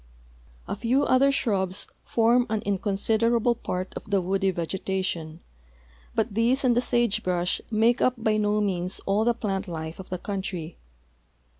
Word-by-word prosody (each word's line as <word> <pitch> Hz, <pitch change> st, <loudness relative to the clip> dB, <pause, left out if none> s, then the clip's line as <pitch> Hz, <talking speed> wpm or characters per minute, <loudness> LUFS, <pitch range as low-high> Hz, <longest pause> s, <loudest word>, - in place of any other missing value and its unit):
V -, -, -2 dB
few 245 Hz, +6 st, +1 dB
other 275 Hz, +2 st, +4 dB
shrubs 195 Hz, -7 st, 0 dB, 0.2 s
form 240 Hz, +2 st, +3 dB
an 220 Hz, -1 st, -1 dB
inconsiderable 220 Hz, +4 st, +1 dB
part 185 Hz, -5 st, -4 dB
of -, -, -8 dB
the 200 Hz, -1 st, +3 dB
woody 195 Hz, +2 st, 0 dB
vegetation, 175 Hz, -2 st, -3 dB, 0.7 s
but -, -, 0 dB
these 235 Hz, +6 st, +2 dB
and 245 Hz, -2 st, +3 dB
the 245 Hz, -, +3 dB
sage 240 Hz, -4 st, +1 dB
brush 180 Hz, 0 st, 0 dB
make 230 Hz, +2 st, +3 dB
up 255 Hz, -, +3 dB
by 220 Hz, -2 st, +1 dB
no 210 Hz, 0 st, +1 dB
means 185 Hz, -2 st, -1 dB
all 200 Hz, +2 st, +2 dB
the 240 Hz, +1 st, +2 dB
plant 200 Hz, -3 st, -2 dB
life 160 Hz, -1 st, -6 dB
of 190 Hz, -, -9 dB
the 185 Hz, -, -3 dB
country. 185 Hz, -4 st, -5 dB
205 Hz, 155 wpm, -26 LUFS, 185-235 Hz, 0.7 s, other